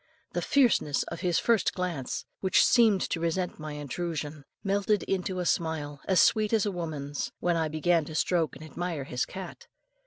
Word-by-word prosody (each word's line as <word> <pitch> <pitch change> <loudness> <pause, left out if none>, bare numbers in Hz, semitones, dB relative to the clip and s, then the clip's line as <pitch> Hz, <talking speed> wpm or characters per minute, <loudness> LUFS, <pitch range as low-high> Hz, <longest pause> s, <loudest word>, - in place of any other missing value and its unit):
The - - -1
fierceness 235 - +3
of - - -6
his 175 -2 +1
first 230 -3 +2
glance, 170 -8 -3
which 190 -2 +4
seemed 225 -6 +5
to 170 - -1
resent 170 +2 -1
my 155 -1 -6
intrusion, 150 0 -4 0.2
melted 200 +1 +1
into 185 -1 -2
a 180 - -1
smile 155 -4 -1
as 190 -2 +3
sweet 215 0 +4
as 220 -2 +3
a 205 - 0
woman's, 150 -5 -4
when 175 -1 +1
I 160 -1 +1
began 160 +1 +1
to 155 - -8
stroke 165 -1 +1
and 155 - -10
admire 165 -2 -4
his 125 -1 -2
cat. 190 - -8
170 Hz, 180 wpm, -28 LUFS, 155-190 Hz, 0.2 s, seemed